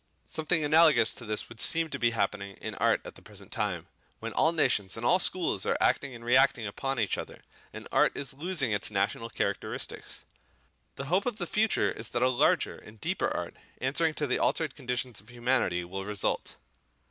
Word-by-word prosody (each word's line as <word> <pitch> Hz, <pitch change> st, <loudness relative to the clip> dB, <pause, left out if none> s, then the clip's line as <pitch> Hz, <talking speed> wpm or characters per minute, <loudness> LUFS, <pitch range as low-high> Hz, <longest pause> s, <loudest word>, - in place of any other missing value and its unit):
Something 160 Hz, +1 st, 0 dB
analogous 150 Hz, -6 st, +5 dB
to 120 Hz, -, -8 dB
this 105 Hz, 0 st, -2 dB
would 120 Hz, -1 st, -5 dB
seem 165 Hz, 0 st, +6 dB
to 140 Hz, -, -4 dB
be 120 Hz, -, +3 dB
happening 100 Hz, -3 st, -2 dB
in -, -, -5 dB
art -, -, +2 dB
at -, -, -8 dB
the -, -, -13 dB
present -, -, -9 dB
time, -, -, -2 dB, 0.3 s
when -, -, -5 dB
all 160 Hz, -, +3 dB
nations 125 Hz, -, +1 dB
and 115 Hz, -, -4 dB
all 180 Hz, +8 st, +4 dB
schools 175 Hz, -, +1 dB
are -, -, 0 dB
acting 140 Hz, -3 st, +1 dB
and 115 Hz, 0 st, -11 dB
reacting 130 Hz, -1 st, +4 dB
upon 135 Hz, +5 st, -3 dB
each 105 Hz, -, 0 dB
other, -, -, -9 dB, 0.3 s
and -, -, -9 dB
art -, -, +3 dB
is 135 Hz, -2 st, -2 dB
losing 150 Hz, -4 st, 0 dB
its 105 Hz, -1 st, +1 dB
national 105 Hz, +3 st, -1 dB
characteristics. 105 Hz, -, -3 dB, 0.7 s
The 140 Hz, -, -5 dB
hope 185 Hz, -, +1 dB
of 240 Hz, -4 st, -2 dB
the 175 Hz, -, -2 dB
future 215 Hz, +5 st, +1 dB
is 110 Hz, -, -4 dB
that 120 Hz, -, 0 dB
a 130 Hz, -, +4 dB
larger 125 Hz, -, +2 dB
and 110 Hz, 0 st, -15 dB
deeper -, -, -1 dB
art, -, -, -4 dB, 0.3 s
answering 155 Hz, +4 st, +1 dB
to 150 Hz, -, -1 dB
the 125 Hz, -, 0 dB
altered 155 Hz, -4 st, 0 dB
conditions 125 Hz, -4 st, -3 dB
of 105 Hz, -, -22 dB
humanity, 120 Hz, -7 st, 0 dB
will 95 Hz, +2 st, -6 dB
result. 105 Hz, -1 st, -2 dB
125 Hz, 195 wpm, -29 LUFS, 110-155 Hz, 0.7 s, seem